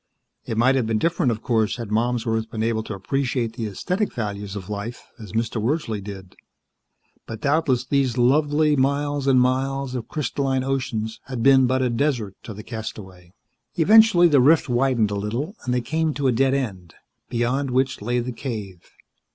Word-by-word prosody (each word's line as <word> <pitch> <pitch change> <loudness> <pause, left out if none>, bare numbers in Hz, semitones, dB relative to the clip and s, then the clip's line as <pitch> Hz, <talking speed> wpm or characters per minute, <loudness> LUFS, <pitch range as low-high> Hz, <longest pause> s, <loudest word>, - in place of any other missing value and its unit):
It 110 - -3
might 125 +4 +4
have 130 -4 0
been 110 -1 +1
different, 165 -1 +1
of 110 -1 -5
course, 110 -3 +1
had 115 -4 -6
Malmsworth 115 0 0
been 110 -1 -3
able 115 -1 0
to 110 - -5
appreciate 120 +2 -2
the 115 -2 -4
aesthetic 180 - -2
values 105 -3 -5
of 95 -3 -7
life, 105 +3 -6
as 105 -4 -10
Mr. 115 0 -1
Wordsley 115 -4 -1
did. 95 -2 -9 0.9
But 110 - -7
doubtless 140 -4 +1
these 130 -2 0
lovely 145 +4 +3
miles 140 +1 0
and 130 -2 +5
miles 130 +1 0
of 125 -3 -4
crystalline 135 -2 -1
oceans 120 -5 -2
had 125 -3 -4
been 135 -1 +6
but 130 +1 +1
a 125 - +1
desert 120 -6 -1
to 110 - -7
the 105 - -9
castaway. 95 -6 -8 0.4
Eventually 195 0 +6
the 145 -5 +4
rift 155 +5 +4
widened 120 -4 +1
a - - -2
little, 115 - -3
and 125 - -1
they 125 0 +1
came 155 +5 -1
to 145 - -2
a 130 - +4
dead 135 +3 +2
end, 95 -11 -4 0.3
beyond 125 +3 0
which 130 -1 0
lay 120 +4 -1
the 125 +1 -2
cave. 110 -7 -7
125 Hz, 180 wpm, -23 LUFS, 110-135 Hz, 0.9 s, been